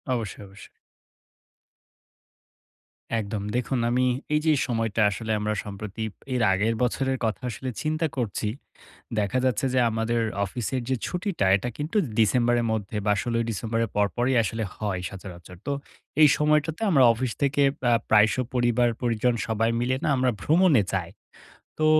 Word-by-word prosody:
অবশ্যই, 110 -3 -5
অবশ্যই। 95 +2 -14 2.6
একদম। 105 -1 -4
দেখুন 125 0 0
আমি 125 +1 +2 0.3
এই 150 - +4
যে 160 - +5 0.2
সময়টা 115 -2 0
আসলে 110 +3 -4
আমরা 105 0 -1
সম্প্রতি, 105 +1 -6 0.3
এর 125 - 0
আগের 110 +4 +1
বছরের 130 +2 0
কথা 110 +3 -2
আসলে 130 +3 -5
চিন্তা 155 +1 0
করছি। 110 -3 -2 0.7
দেখা 105 +5 0
যাচ্ছে 130 +1 +1
যে - - +3
আমাদের 115 +1 0 0.2
অফিসের 120 +5 -3
যে 130 - +1
ছুটিটা, 180 - -1
এটা 110 +5 -4
কিন্তু 155 +8 -3 0.2
ডিসেম্বরের 120 +2 +3
মধ্যে 105 -1 -3
বা 105 - +4
১৬ই 115 -1 0
ডিসেম্বরের 115 +1 -1
পরপরই 120 +6 +1
আসলে 110 +2 -3
হয় 100 -4 -2
সচরাচর। 90 -2 -10
তো 145 - 0 0.5
এই 150 - +9
সময়টাতে 150 +2 +1
আমরা 135 -6 +5
অফিস 120 0 -2
থেকে 140 0 +2 0.3
আ - - +4 0.2
প্রায় 105 0 +6
শ - - -1 0.2
পরিবার-পরিজন 120 -1 +1
সবাই 115 +1 +1
মিলে 130 +2 +1
না - - +1
আমরা 125 0 +2
ভ্রমণে 160 - +4
যায়। 90 -3 -2 0.7
তো 155 - +2
115 Hz, 145 wpm, -25 LUFS, 105-130 Hz, 2.6 s, এই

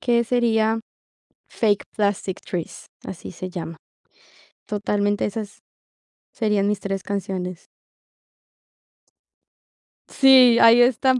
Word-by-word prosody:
que 235 -1 +2
sería 225 -2 +1 0.7
Fake 210 -3 0
Plastic 200 -2 -2
Trees, 175 -3 -6 0.2
así 185 - -8
se 185 +1 -7
llama. 165 -2 -7 0.9
Totalmente, 205 0 -1
esas 205 0 -6 0.7
serían 210 -3 0
mis 210 -1 -1
3 195 -1 -4
canciones. 185 -3 -5 2.4
Sí, 260 -3 +6
ahí 230 +1 +7
están 255 +1 +2
210 Hz, 90 wpm, -22 LUFS, 195-235 Hz, 2.4 s, ahí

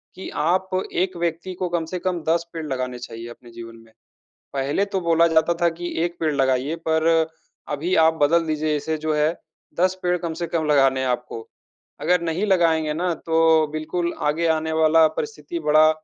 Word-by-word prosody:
कि 190 - -7 0.2
आप 185 +3 +1 0.2
1 185 +1 0
व्यक्ति 170 +2 -3
को 180 - -1
कम 170 -1 -1
से 180 - -3
कम 180 -1 -2
10 170 +1 +2
पेड़ 165 -2 -5
लगाने 130 -2 -3
चाहिए 115 -1 -8
अपने 120 0 -13
जीवन 115 0 -10
में। 115 - -22 0.6
पहले 140 +8 0
तो 190 - +1
बोला 170 -1 +3
जाता 165 +1 +2
था 170 - +5
कि 175 0 -4
1 175 0 -3
पेड़ 155 -2 +1
लगाइए 135 +3 +1
पर, 160 0 +3 0.4
अभी 155 +5 -1
आप 160 - +3
बदल 165 +3 +3
दीजिए 155 -1 0
इसे 155 +2 -2
जो 155 0 -2
है 150 +1 +2 0.5
10 185 +1 +3
पेड़ 180 0 +1
कम 165 -1 -4
से - - 0
कम 165 -1 -1
लगाने 135 -2 +3
हैं 130 - -1
आपको। 120 -2 -4 0.5
अगर 180 -1 +2
नहीं 170 +5 -1
लगाएँगे 165 -5 +2
ना 175 +2 0
तो 160 -1 +4
बिल्कुल 170 +3 -2 0.2
आगे 165 +3 -1
आने 160 0 -3
वाला 160 +1 +6
परिस्थिति 150 +2 -4
बड़ा 155 +1 +6
160 Hz, 190 wpm, -22 LUFS, 150-170 Hz, 0.6 s, वाला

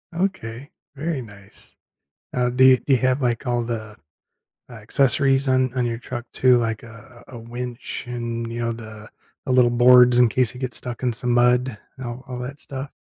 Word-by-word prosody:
Okay, 145 - -3 0.2
very 155 0 -3
nice. 100 -4 -15 0.6
Uh, 125 -1 +1
do 130 +2 +3
you 130 0 +8
do 140 - -2
you - - +6
have, 130 +3 +1
like, 120 +1 -1
all 120 -1 0
the, 110 -3 -5 0.7
uh, - - -11
accessories 135 +4 +1
on 130 -1 +2
on 125 -1 +1
your 115 -1 -2
truck 120 0 -7
too, 125 -1 +4
like 115 -2 -2
a 115 +1 -14
a 120 - -10
winch 120 +2 -6
and, 115 -1 -4
you 120 +1 -4
know, 115 0 -1
the 110 -2 -10 0.4
the - - -1
little 125 -1 +4
boards 125 0 +6
in 120 -2 +5
case 125 0 0
you 125 - -10
get 130 -2 -4
stuck 125 0 -7
in 125 - +2
some 125 +2 -3
mud 125 0 +2 0.2
and 130 - -7
all 120 +2 -6
all 125 -1 -6
that 135 +4 -7
stuff? 135 0 -7
125 Hz, 200 wpm, -22 LUFS, 115-130 Hz, 0.7 s, you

